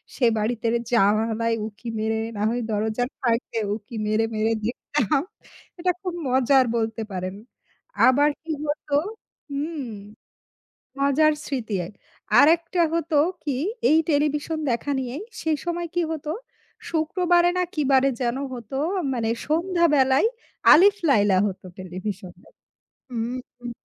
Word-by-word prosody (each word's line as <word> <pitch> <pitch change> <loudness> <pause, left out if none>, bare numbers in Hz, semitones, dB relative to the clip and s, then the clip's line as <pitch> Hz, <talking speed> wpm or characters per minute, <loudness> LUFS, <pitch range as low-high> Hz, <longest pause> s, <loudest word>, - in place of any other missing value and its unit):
সে 250 - +1
বাড়িতে 230 +2 -1 0.3
জানালায় 225 +2 +2
উঁকি 220 +2 -11
মেরে, 220 +1 0 0.2
না - - -3
হয় 240 +2 -1
দরজার 220 +4 -1
ফাঁক 235 -2 +2
দে 230 - 0 0.2
উঁকি 220 +2 -10
মেরে, 215 +1 +2
মেরে 220 +1 +1
দেখতাম। 285 +4 0 0.6
এটা 360 +1 +2
খুব 365 -3 -3 0.2
মজার 260 +1 +4
বলতে 225 0 -2
পারেন। 185 0 -4 0.7
আবার 285 +3 +5
কি 325 - -5
হত? 295 +1 -3 0.6
হুম, 295 +1 -3 1.2
মজার 280 +3 +4
স্মৃতি 235 -7 -3
এক 200 - -14 0.5
আর 285 - +8
একটা 340 +1 -2
হত 335 0 -2 0.3
কি? 285 -4 -1 0.3
এই 310 - +5
টেলিভিশন 300 +1 0
দেখা 235 +5 -2
নিয়েই, 260 +5 -4 0.2
সেই 315 -2 0
সময় 345 0 -2
কি 350 - +2
হত, 315 -2 -5 0.6
শুক্রবারে 345 +2 +2
না 365 - +2
কি 305 - -1
বারে 265 +1 +5
যেন 240 0 0 0.2
হত 235 -4 -9 0.4
মানে 230 -2 -1 0.2
সন্ধ্যা 340 +3 +1
বেলায় 265 +6 +4 0.4
'Alif 395 +5 +7
Laila' 205 -7 +4
হত 195 -2 -6 0.2
টেলিভিশনে 185 0 -7 0.6
হুম, 235 0 -3 0.2
হুম, 240 -1 -6
255 Hz, 135 wpm, -24 LUFS, 225-310 Hz, 1.2 s, আর